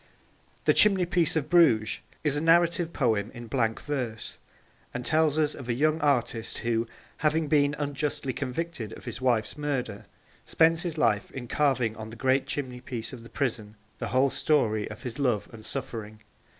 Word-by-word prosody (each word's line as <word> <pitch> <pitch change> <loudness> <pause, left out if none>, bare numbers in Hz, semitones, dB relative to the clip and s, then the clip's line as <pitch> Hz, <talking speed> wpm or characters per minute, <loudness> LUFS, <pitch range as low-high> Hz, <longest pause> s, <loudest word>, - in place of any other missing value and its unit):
The - - +5
Chimneypiece 180 -5 +3
of 155 -3 0
Bruges 155 -11 +4 0.2
is 150 -2 +2
a 145 - 0
narrative 170 +1 +3
poem 110 -8 +1
in 120 0 -8
blank 115 -1 0
verse, 125 -7 -4 0.6
and 125 0 -4
tells 155 -1 +2
us 150 -1 +2
of 125 -3 -9
a 120 - +1
young 155 +4 +2
artist 120 -5 0
who, 115 0 +1 0.3
having 155 0 +1
been 145 -1 +3
unjustly 145 -2 -2
convicted 135 -3 -4
of - - -11
his 120 +1 -6
wife's 120 +1 +1
murder, 130 -8 -3 0.4
spends 165 0 +3
his 170 -3 -4
life 105 -7 +2
in 125 -2 -7
carving 130 -5 +1
on 110 0 -7
the 115 - -9
great 130 +3 +1
chimneypiece 125 -4 -5
of 125 - -8
the 115 - -13
prison 110 -6 -2 0.2
the - - -3
whole 130 +2 +2
story 110 -9 +1
of - - -10
his 125 +1 -6
love 125 -7 +1
and 110 -1 -11
suffering. 110 -5 -6
130 Hz, 170 wpm, -27 LUFS, 115-150 Hz, 0.6 s, The